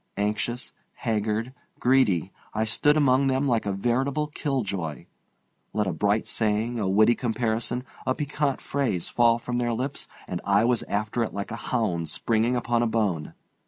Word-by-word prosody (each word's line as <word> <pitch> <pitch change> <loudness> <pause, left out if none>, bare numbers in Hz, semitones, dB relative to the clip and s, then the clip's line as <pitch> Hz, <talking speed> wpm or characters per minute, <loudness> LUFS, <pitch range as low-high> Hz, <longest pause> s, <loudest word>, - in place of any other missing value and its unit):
Anxious, 105 +4 -1 0.2
haggard, 110 +1 -1 0.3
greedy, 110 -9 +3 0.2
I 110 +1 +1
stood 145 +8 +3
among 135 -2 +4
them 135 +1 +1
like 115 -5 +1
a - - +1
veritable 130 +9 0
killjoy. 105 - -3 0.7
Let 105 -1 +1
a 95 - -1
bright 105 +6 +1
saying, 110 +2 0
a 100 -3 0
witty 110 +4 +5
comparison, 120 0 -1 0.2
a 130 - +2
piquant 145 -1 -1
phrase 125 -12 -1
fall 120 -1 +4
from 120 +1 -3
their 120 -1 0
lips 130 +4 -3 0.2
and 90 - -4
I 100 +2 +3
was 120 -1 +2
after 105 +3 -1
it 110 - -5
like 100 +1 -4
a - - -3
hound 90 -10 0
springing 115 +2 +1
upon 120 -1 +1
a 120 - +2
bone. 105 -9 -1
115 Hz, 160 wpm, -26 LUFS, 105-125 Hz, 0.7 s, witty